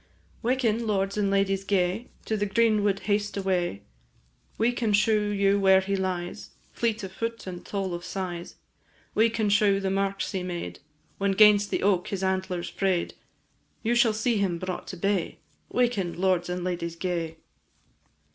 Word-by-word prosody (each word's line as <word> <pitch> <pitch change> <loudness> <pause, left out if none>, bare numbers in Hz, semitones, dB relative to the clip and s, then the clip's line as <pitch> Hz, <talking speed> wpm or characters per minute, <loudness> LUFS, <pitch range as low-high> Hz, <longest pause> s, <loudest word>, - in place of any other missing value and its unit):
Waken, 235 -2 +1
lords 195 -1 0
and 205 -2 +1
ladies 195 0 +1
gay, 195 +3 0 0.2
To 220 - -1
the 205 -1 0
green 215 0 +3
wood 200 -1 +1
haste 205 0 -1
away; 180 - -1 0.7
We 230 +2 +3
can 230 -3 -1
shew 210 0 +3
you 200 0 +2
where 190 -1 +6
he 195 +1 -1
lies, 185 -2 -3 0.2
Fleet 230 -2 -1
of 190 - -5
foot 230 +3 -4
and 180 -2 -7
tall 195 -3 -3
of 175 0 -5
size; 175 -2 -5 0.6
We 225 +2 +4
can 220 -1 -1
shew 200 -1 +4
the 195 -1 -1
marks 195 0 -1
he 190 -3 -2
made 170 - -5 0.4
When 200 0 +2
'gainst 205 0 +6
the - - -1
oak 190 -3 +2
his 195 -1 -3
antlers 185 -2 -1
fray'd; 190 -3 0 0.7
You 235 +1 +2
shall 235 -1 +4
see 220 +1 +1
him 190 -4 0
brought 185 +1 -5
to 185 - -6
bay, 195 -1 -1 0.3
"Waken, 210 -9 0
lords 185 -2 +1
and 180 0 -3
ladies 170 -2 -3
gay." 170 -2 -3
195 Hz, 165 wpm, -27 LUFS, 185-210 Hz, 0.7 s, where